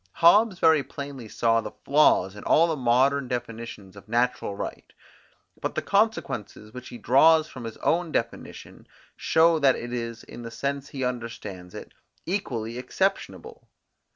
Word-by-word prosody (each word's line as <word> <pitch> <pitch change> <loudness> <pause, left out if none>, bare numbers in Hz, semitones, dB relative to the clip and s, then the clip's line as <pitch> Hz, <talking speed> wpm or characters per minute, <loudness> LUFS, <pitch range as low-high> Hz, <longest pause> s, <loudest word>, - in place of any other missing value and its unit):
Hobbes 200 +4 +5
very 160 -3 +4
plainly 140 -3 -8
saw 115 +1 +2
the - - -8
flaws 135 -10 +4
in 105 - -10
all 165 - +4
the 165 -2 -1
modern 130 +1 +2
definitions 115 -5 -6
of 100 0 -14
natural 120 -3 0
right: - - -7 0.7
but - - -3
the - - -2
consequences, 135 - -1
which 125 0 -9
he 120 - -9
draws 155 +7 +5
from 125 -3 -9
his 115 - -7
own 170 0 0
definition, - - -5 0.3
show 165 0 +3
that 135 -3 +4
it 120 +1 -6
is, 115 -1 -5
in 120 - -11
the 115 - -7
sense 140 +4 -4
he 135 -2 -5
understands 115 -7 -5
it, - - -10 0.3
equally 120 - -3
exceptionable. 195 - -3
125 Hz, 155 wpm, -25 LUFS, 115-160 Hz, 0.7 s, Hobbes